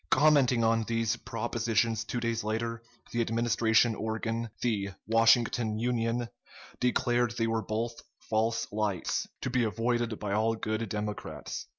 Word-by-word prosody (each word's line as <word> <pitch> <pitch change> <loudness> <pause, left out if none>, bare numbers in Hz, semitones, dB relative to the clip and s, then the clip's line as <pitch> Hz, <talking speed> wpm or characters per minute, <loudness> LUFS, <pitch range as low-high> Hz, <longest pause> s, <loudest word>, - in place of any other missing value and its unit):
Commenting 130 -4 +4
on 115 0 +3
these 115 -1 0
propositions 115 -1 -1
two 120 +2 -3
days 115 -2 -1
later, 115 +2 -2 0.3
the 120 - 0
Administration 115 0 +3
organ, 115 +1 -3
the 105 -5 0 0.2
"Washington 115 0 +3
Union," 120 0 0 0.5
declared 120 -1 +1
they 115 - +1
were 115 0 0
both 115 +2 -3 0.2
"false 115 +1 0
lights," 105 -4 -1
to 130 - -2
be 125 -1 +2
avoided 115 0 0
by 100 -2 -3
all 110 +2 +2
good 110 0 -2
Democrats. 105 0 -5
115 Hz, 130 wpm, -29 LUFS, 110-120 Hz, 0.5 s, Commenting